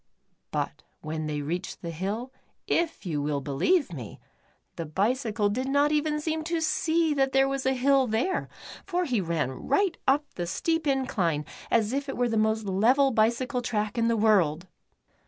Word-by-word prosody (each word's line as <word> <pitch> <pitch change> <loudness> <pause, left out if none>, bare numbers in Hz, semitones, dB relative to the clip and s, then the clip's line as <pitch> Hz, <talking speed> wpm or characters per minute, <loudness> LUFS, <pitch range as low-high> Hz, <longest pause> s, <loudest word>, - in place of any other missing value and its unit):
But - - -3 0.2
w^hen 155 0 -3
they 150 -1 -3
reached 175 +7 -4
the 170 - -4
hill, 205 +10 -4 0.3
if 330 -9 -1
you 155 -5 -1
will 145 0 -1
be 140 +1 -6
lieve 195 - +2
me, 120 -9 -8 0.6
the 165 - -5
bicycle 210 - 0
did 250 +6 -1
not 285 +2 +3
even 300 0 +1
seem 315 +1 -2
to 335 0 -1
see 330 -2 +1
that 270 -2 +1
there 270 0 +4
was 270 -1 -2
a 265 - +3
hill 265 +1 +3
there, 240 - -1 0.3
for 360 -1 -1
he 245 - 0
ran 165 -6 -1
right 370 - 0
up 285 +3 +3
the 175 -1 -4
steep 325 - -1
incline, 190 - 0 0.2
as 225 0 +2
if 280 0 -2
it - - -4
were 245 -1 +1
the 225 - -1
most 220 0 +1
level 240 +9 +3
bicycle 240 +3 +1
track 215 -3 -2
in 230 -1 +2
the 230 -1 +2
world. 190 -7 +3
235 Hz, 180 wpm, -27 LUFS, 185-280 Hz, 0.6 s, there